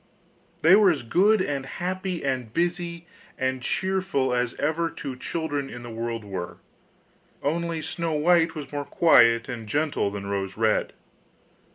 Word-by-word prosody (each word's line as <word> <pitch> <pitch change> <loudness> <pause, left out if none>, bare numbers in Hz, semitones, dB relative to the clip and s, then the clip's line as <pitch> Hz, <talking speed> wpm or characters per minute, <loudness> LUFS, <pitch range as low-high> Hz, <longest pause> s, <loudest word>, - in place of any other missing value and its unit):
They 165 +4 +8
were 205 -2 +6
as 155 -7 0
good 195 - +3
and 140 -4 -2
happy, 185 +4 -4
as 130 -3 -1
busy 170 - -2 0.3
and 130 0 -1
cheerful 185 -6 0
as 125 -1 0
ever 160 +3 0
two 135 -5 -6
children 145 0 -3
in 120 0 -8
the 120 - -8
world 115 0 -4
were, 95 -3 -5 0.9
only 165 +2 -1
Snow 165 +1 -2
white 165 +1 +3
was 150 -3 -7
more 145 -1 -3
quiet 115 -10 +5
and 115 -4 -6
gentle 145 -4 0
than 100 0 -6
Rose 100 -1 -3
red. 110 -1 +1
145 Hz, 150 wpm, -25 LUFS, 120-170 Hz, 0.9 s, They